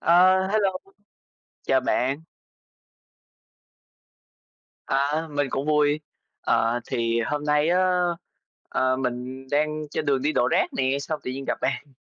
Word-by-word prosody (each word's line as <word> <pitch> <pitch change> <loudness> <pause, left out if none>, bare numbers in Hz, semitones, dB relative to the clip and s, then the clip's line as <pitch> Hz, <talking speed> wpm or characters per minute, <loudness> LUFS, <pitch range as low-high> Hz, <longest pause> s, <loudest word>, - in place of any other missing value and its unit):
Ờ, 185 +2 +5
hello! 205 -2 +2 0.9
Chào 135 - +3
bạn! 130 +3 0 2.7
À, 145 +4 0
mình 145 -1 0
cũng 135 +3 -2
vui. 150 0 +2 0.4
Ờ, 115 +2 +1
thì 115 0 0
hôm 145 +6 -2
nay 150 +1 +2
á, 180 - +3 0.9
ờ, 130 0 +1
mình 130 +1 -4
đang 150 +1 0
trên 155 - -2
đường 135 -2 +2
đi 150 +2 +1
đổ 120 - +2
rác - - +2
nè, 135 +1 +1
xong 155 +2 -4
tự - - -3
nhiên 135 +1 -5
gặp - - -1
bạn. 135 +1 -2
145 Hz, 135 wpm, -25 LUFS, 130-155 Hz, 2.7 s, Ờ